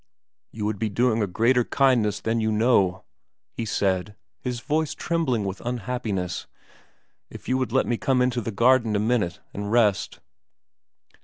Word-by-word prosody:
' - - -63
You 105 -2 -4
would 105 -1 -2
be 110 - 0
doing 115 +2 +1
a 105 - +1
greater 120 +6 +2
kindness 115 -6 +2
than 115 +1 0
you 110 0 +1
know,' 105 -5 +2 0.5
he 115 - -4
said, 100 -1 -1 0.2
his 125 -2 -4
voice 155 +3 -1
trembling 130 -11 -1
with 95 0 -5
unhappiness, 115 -6 -3 0.4
' - - -41
if - - -11
you 130 - +1
would 130 -3 -2
let 130 - +2
me 120 - -1
come 130 +1 +1
into 125 -1 +1
the 115 - -4
garden 115 0 +3
a - - +2
minute 105 -6 0
and 100 +1 -4
rest.' 110 -4 +2
115 Hz, 170 wpm, -24 LUFS, 105-125 Hz, 0.5 s, garden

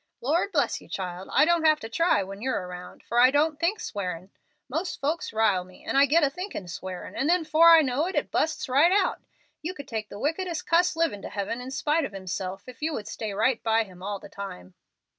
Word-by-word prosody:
"Lord 330 +10 0
bless 295 -6 0
you, - - -16
child; 185 -1 -5
I - - +5
don't 340 0 +2
have 310 -1 +5
to - - -5
try 230 - +2
when 195 +2 -9
you're 255 -7 -1
around, 180 0 -10
for 240 - 0
I 250 +1 +8
don't 295 +2 +1
think 370 +7 +1
swearin'. 185 - -5 0.4
Most 320 +8 -3
folks 310 +5 -2
rile 215 -4 +2
me, 185 0 -17
and - - -2
I 280 +1 +6
get 320 +4 +4
a 285 - +4
thinkin' 360 - -6
swearin', 180 +2 -7
and 275 - 0
then 350 -2 +3
'fore 315 +2 +6
I 330 -1 +8
know 275 +5 0
it 335 -6 -2
busts 315 - 0
right 280 +7 +4
out. 390 0 +2 0.4
You 355 +4 -4
could 285 - -9
take 220 -2 -4
the - - -8
wickedest 330 - -2
cuss 345 +1 +3
livin' 325 -12 0
to - - -7
heaven 215 +4 -3
in 250 - -7
spite 300 +4 0
of 205 - -4
himself 190 0 -5
if 255 +1 -12
you 315 +1 -1
would 210 -6 -5
stay 220 -2 -4
right 225 +5 +1
by 225 0 +2
him 185 -4 -15
all 200 +1 -3
the 195 - -12
time." 95 - -8
260 Hz, 235 wpm, -26 LUFS, 200-320 Hz, 0.4 s, I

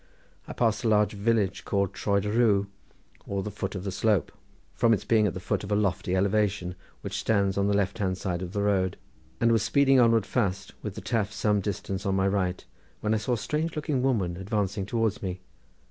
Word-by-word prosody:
I - - -6
passed 115 -1 +1
a - - +1
large 105 -1 +3
village 105 -2 0
called 100 -2 0
Troed 100 -1 0
y 105 - -1
Rhiw, 105 -4 +3 0.6
or 100 -1 -2
the 105 - -4
foot 105 - -4
of 90 - -4
the 100 - -3
slope, 100 -3 +1 0.4
from 115 -2 +4
its - - -7
being 110 -2 +3
at 95 - -3
the - - -4
foot 95 - -2
of 100 - -7
a - - +3
lofty 95 -3 0
elevation, 100 -2 +1 0.3
which - - -4
stands 100 -3 +1
on 100 0 +1
the 100 - +2
left 100 +2 -1
hand 95 -2 0
side 90 -2 -3
of 90 -1 -5
the 100 +1 -1
road, 95 -3 +1 0.4
and 115 - +3
was 115 -2 +3
speeding 135 +3 +4
onwards 115 -3 +4
fast, 100 -4 -1
with 105 -3 -5
the - - -6
Taf 115 -4 0
at 105 - -15
some 105 -2 +1
distance 100 0 -4
on 95 - +1
my 95 0 +2
right, 95 -2 -1 0.4
when 105 0 +1
I - - +3
saw 110 +4 -1
a - - +1
strange 155 +9 -2
looking 150 -3 -1
woman 100 -10 0
advancing 100 0 -2
towards 115 -2 0
me. 90 -1 -4
100 Hz, 225 wpm, -27 LUFS, 95-110 Hz, 0.6 s, from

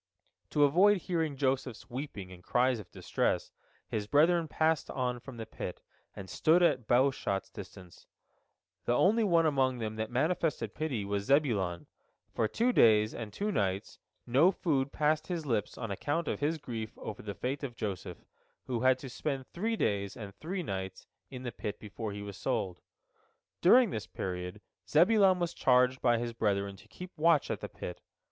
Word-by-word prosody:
To 145 - +3
avoid 185 +9 +5
hearing 160 -5 -2
Joseph's 130 -4 -1
weeping 120 -7 -6
and 90 -1 -12
cries 125 +2 +2
of 95 -4 -11
distress, - - -1 0.4
his 105 -1 -3
brethren 165 +5 +4
passed 160 0 +1
on 125 -2 -2
from 125 0 -10
the 110 - -5
pit, - - -7 0.3
and 95 - -8
stood 160 - +3
at 170 - +5
a - - -21
bow 125 +4 +3
shot's 100 -6 -3
distance. 95 -3 -11 0.8
The 120 - +2
only 220 - +4
one 170 -5 +4
among 135 -4 +2
them 110 -2 -4
that 110 0 -2
manifested 140 - 0
pity 135 -10 -2
was 100 0 -2
Zebulon. 105 - +1 0.5
For 110 - +1
two 240 - +1
days 110 - +5
and 110 -3 -6
two 205 - -2
nights 100 - -2 0.3
no 135 +9 +5
food 140 -7 0
passed 155 +1 +1
his 170 -4 -3
lips 115 -6 -1
on 115 -4 -4
account 145 - -2
of - - -2
his 155 +3 0
grief 115 -7 -6
over 110 - -7
the 100 -1 -6
fate 135 +3 -3
of 130 -4 -5
Joseph, 100 -5 -5 0.4
who 120 -3 -2
had 130 0 +4
to 135 - -8
spend 135 +1 -3
three 225 +6 -1
days 100 - -1
and 105 -4 -8
three 180 - -4
nights 95 - -5 0.2
in 130 -2 -8
the 120 - -3
pit 105 -2 -5
before 105 +1 -6
he 100 0 -6
was 100 -1 -8
sold. 105 -9 -2 0.8
During 235 +4 +6
this 105 -5 -4
period 90 0 -5 0.3
Zebulon 195 -1 +5
was 175 -1 -2
charged 125 -2 +3
by 120 -2 +3
his 120 0 -3
brethren 100 -3 0
to - - -17
keep 180 0 -10
watch 160 -2 +4
at - - -2
the - - -5
pit. 90 - -7
125 Hz, 180 wpm, -31 LUFS, 105-155 Hz, 0.8 s, During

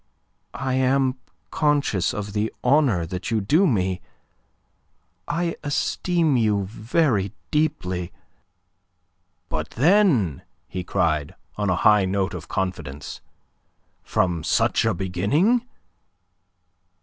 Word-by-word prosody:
I 130 0 -2
am 130 0 +2 0.3
conscious 145 - +1
of 105 -1 -5
the 105 +1 -1
honour 125 - +3
that 90 +2 -5
you 115 -2 +1
do 155 - +3
me. 95 - 0 1.3
I 170 0 -1
esteem 160 +1 0
you 105 -4 +1
very 110 - 0 0.2
deeply..." 95 - -1 1.4
"But, 80 -1 -3
then," 140 - +3 0.3
he 90 -1 -5
cried, 80 -6 0 0.2
on 105 -1 -1
a 90 - +2
high 105 -2 +6
note 95 0 -1
of 80 -4 -7
confidence, 80 -7 -4 0.8
"from 85 -3 0
such - - +2
a - - +1
beginning..." 140 - +1
105 Hz, 100 wpm, -23 LUFS, 90-145 Hz, 1.4 s, high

